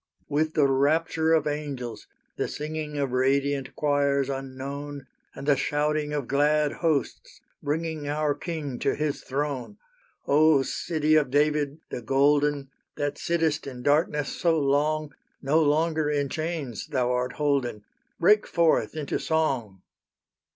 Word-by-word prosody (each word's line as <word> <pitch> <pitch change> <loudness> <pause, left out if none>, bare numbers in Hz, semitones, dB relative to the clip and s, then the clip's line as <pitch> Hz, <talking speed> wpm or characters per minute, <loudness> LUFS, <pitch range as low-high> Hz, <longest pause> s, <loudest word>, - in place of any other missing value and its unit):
With 155 +2 0
the 150 - +4
rapture 160 +4 +2
of 160 - +3
angels, 145 -6 -4 0.3
the - - -1
singing 150 0 -5
Of 140 -3 -1
radiant 135 +1 0
choirs 140 -2 +1
unknown, 135 +1 -6 0.3
And - - -7
the 145 - +5
shouting 150 +2 0
of 145 -4 -2
glad 150 +1 +2
hosts 155 -6 -1 0.2
bringing 155 0 -2
Our 150 0 +1
King 150 -6 -5
to - - +1
His 150 -1 -2
throne! 140 - -3 0.5
O 150 -1 +5
City 155 +1 0
of 155 -3 +4
David, 150 +1 +1
the - - -4
Golden, 140 +2 +2 0.2
That 145 0 -3
sittest 160 -3 0
in 125 -2 -7
darkness 150 0 +2
so 165 -2 +2
long, 150 +1 +1 0.3
No 150 +4 +2
longer 155 0 +2
in 145 -2 0
chains 155 - -4
thou 125 -2 0
art 125 0 -1
holden, 135 -7 -1 0.4
Break 210 +5 +4
forth 165 -2 +2
into 150 -2 -2
song! 130 - -1
145 Hz, 135 wpm, -26 LUFS, 140-155 Hz, 0.5 s, the